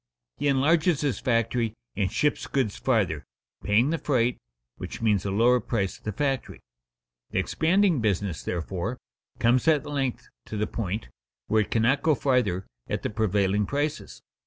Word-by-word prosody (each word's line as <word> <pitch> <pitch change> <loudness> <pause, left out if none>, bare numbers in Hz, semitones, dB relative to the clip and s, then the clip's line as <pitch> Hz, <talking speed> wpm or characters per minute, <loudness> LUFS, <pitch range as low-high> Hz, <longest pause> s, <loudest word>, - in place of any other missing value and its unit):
He 145 - -1
enlarges 155 +4 +3
his 140 -8 0
factory 115 -1 0 0.2
and 100 -2 0
ships 150 -1 0
goods 130 -7 0
farther, 100 - 0 0.4
paying 115 +8 +3
the 165 - -1
freight, 125 -4 +1 0.4
which - - -7
means 105 -4 +1
a - - 0
lower 120 +5 +4
price 105 -4 -2
at - - -30
the 110 - -1
factory. 135 -1 -2 0.7
The - - -4
expanding 175 - +2
business, 100 - 0
therefore, 90 - -3 0.4
comes 120 +5 +2
at 155 -4 +4
length 135 -4 -2 0.2
to 110 - -5
the 105 - +1
point 105 - -4 0.4
where 110 - +3
it 105 - -3
cannot 120 +5 +2
go 155 -2 +3
farther 120 -10 +1 0.2
at - - -2
the - - -2
prevailing 105 -1 +1
prices. 145 - -3
115 Hz, 160 wpm, -26 LUFS, 105-140 Hz, 0.7 s, lower